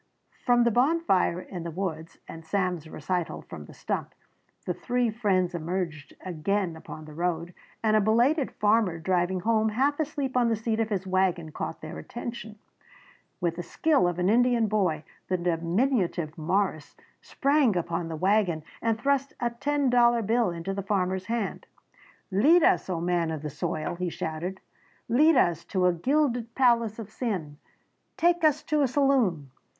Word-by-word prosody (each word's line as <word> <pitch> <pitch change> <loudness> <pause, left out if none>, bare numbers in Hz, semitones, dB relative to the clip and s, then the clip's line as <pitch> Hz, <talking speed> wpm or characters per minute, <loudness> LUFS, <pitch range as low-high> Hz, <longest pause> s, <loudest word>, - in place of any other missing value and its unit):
From 245 -1 +5
the 235 - +3
bonfire 245 - +2
in 180 -1 -7
the 170 - -5
woods 165 -2 -5
and 165 - -9
Sam's 180 -2 -2
recital 175 +3 -3
from - - -10
the - - -13
stump, - - -4 0.5
the - - -1
three 245 -2 0
friends 190 -5 +1
emerged 165 -3 -4
again 185 +1 -1
upon 155 -1 -10
the 155 - -11
road, 170 +1 -2 0.3
and 215 -1 +3
a 215 - +5
belated 245 +8 +2
farmer 210 -4 +2
driving 180 +2 0
home 220 +1 +2
half 275 +7 +1
asleep 285 -4 -2
on 245 -2 +3
the 225 - +2
seat 220 +1 -2
of 225 -1 0
his 195 -3 -2
wagon 185 -4 0
caught 160 - -5
their 155 - -7
attention. 235 -2 -7 0.8
With 170 -2 -1
the - - -2
skill 285 - +2
of 175 -1 -2
an 180 0 +1
Indian 240 +1 +3
boy 190 -8 0 0.2
the 185 - 0
diminutive 175 - 0
Morris 165 -1 -1 0.3
sprang 275 -7 +2
upon 170 0 -2
the 165 - -5
wagon 185 -2 +1 0.2
and 225 -1 0
thrust 275 +1 0
a 240 -1 0
ten 280 +2 0
dollar 240 -1 +4
bill 225 0 +2
into 170 +3 -4
the 200 - -3
farmer's 190 -2 -1
hand. 230 -3 -3 0.6
"Lead 300 - +5
us, - - +3
O 175 -3 -1
man 175 -1 0
of 155 -2 -4
the 150 - -4
soil!" 155 +3 -3
he 180 0 -2
shouted, 170 +4 -5 0.5
"Lead 300 +7 +5
us 170 - +2
to 185 -2 0
a 180 - +4
gilded 245 - 0
palace 235 -4 +3
of 220 -2 -8
sin! 185 - -3 0.6
Take 345 0 +2
us 305 -1 +3
to 305 -2 +1
a 275 - +3
saloon! 245 - +1
195 Hz, 165 wpm, -27 LUFS, 170-240 Hz, 0.8 s, From